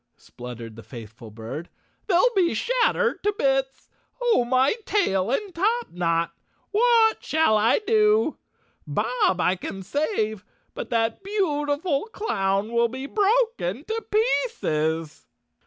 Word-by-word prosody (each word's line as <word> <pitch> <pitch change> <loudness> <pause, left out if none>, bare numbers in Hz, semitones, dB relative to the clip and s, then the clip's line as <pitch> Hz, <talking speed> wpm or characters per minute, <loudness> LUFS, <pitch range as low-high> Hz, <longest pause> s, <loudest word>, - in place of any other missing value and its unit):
" - - -50
spluttered 120 -2 -10
the 115 - -10
faithful 115 0 -11
bird, 115 +10 -7 0.4
"they'll 405 +6 +3
be 350 - +2
shattered 485 - +1
to 415 - +1
bits! 270 -1 0 0.3
Oh, 480 - +3
my 255 +3 +3
tail 195 - +1
and 385 - -2
top 445 +7 0
knot! 170 -1 0 0.4
What 450 +1 +3
shall 315 -8 +2
I 215 +2 +4
do? 430 0 +3 0.5
Bob 210 +4 0
I 180 +1 +2
can 190 +1 -7
save, 220 - -1 0.3
but - - -6
that 225 +4 0
beautiful 305 -6 -1
clown 195 - -1
will 235 0 +3
be 260 +3 -6
broken 415 - +1
to 445 +1 -3
pieces!" 165 - 0
265 Hz, 125 wpm, -24 LUFS, -, 0.5 s, I